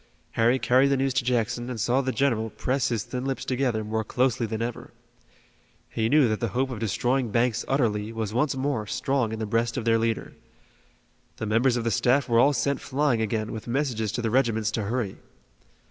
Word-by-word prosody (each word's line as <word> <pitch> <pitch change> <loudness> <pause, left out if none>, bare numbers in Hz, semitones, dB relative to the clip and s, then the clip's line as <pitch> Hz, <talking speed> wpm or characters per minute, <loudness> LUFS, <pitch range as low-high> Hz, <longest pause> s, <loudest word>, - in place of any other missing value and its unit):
Harry 120 +3 +3
carried 130 +1 +3
the 140 0 +2
news 135 0 0
to 135 0 +1
Jackson 120 0 -1
and 120 -3 -5
saw 125 +5 +2
the 130 -1 -1
general 120 -5 0
press 130 +5 -1
his 115 -4 -1
thin 125 -1 -5
lips 135 0 -3
together 125 -4 0
more 110 +1 -2
closely 125 0 0
than 110 0 -4
ever. 115 +1 -4 1.0
He 110 0 0
knew 145 -1 +5
that 110 -1 -1
the 115 - -1
hope 130 0 +1
of 115 - -5
destroying 120 +4 0
Banks 115 +1 +1
utterly 110 -6 0
was 110 -2 -4
once 135 +4 +1
more 130 -5 -2
strong 135 -3 0
in 110 - -3
the 110 - -3
breast 115 +3 0
of 120 - -3
their 115 -1 +3
leader. 115 0 -2 1.0
The 110 - -4
members 115 +4 +2
of 120 - -2
the 115 - 0
staff 130 +4 +2
were 115 -1 +3
all 140 +4 +5
sent 140 +3 0
flying 140 -4 0
again 110 0 -1
with 110 0 -7
messages 120 -5 -1
to 120 - -2
the 115 - 0
regiments 115 -4 +1
to 110 -2 -2
hurry. 110 -3 -2
120 Hz, 210 wpm, -26 LUFS, 110-130 Hz, 1.0 s, knew